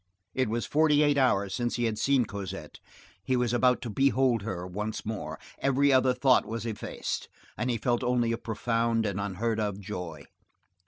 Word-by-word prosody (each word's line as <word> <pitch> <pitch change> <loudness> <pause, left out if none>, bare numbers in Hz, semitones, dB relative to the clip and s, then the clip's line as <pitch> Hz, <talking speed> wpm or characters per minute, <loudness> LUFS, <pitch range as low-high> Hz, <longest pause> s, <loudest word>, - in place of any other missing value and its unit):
It 130 -3 0
was 115 +2 -1
forty 150 -1 +4
eight 145 -1 +3
hours 100 -7 +2
since 120 -1 -1
he 120 - -1
had 110 -2 0
seen 135 -3 +3
Cosette; 95 -7 -7 0.4
he 130 - +1
was 125 -1 +1
about 125 +1 +3
to 120 - -4
behold 130 -2 +2
her 95 -4 -4
once 105 +4 -4
more; 110 -1 -4 0.2
every 140 +1 +3
other 130 -1 +4
thought 130 0 +4
was 115 0 -4
effaced, 110 -3 -4 0.3
and 125 - -2
he 120 - +1
felt 120 +1 0
only 120 -2 +1
a 115 - 0
profound 115 0 0
and 100 -1 -2
unheard 105 +3 -1
of 105 -2 -2
joy. 90 -7 -6
115 Hz, 180 wpm, -28 LUFS, 105-130 Hz, 0.4 s, forty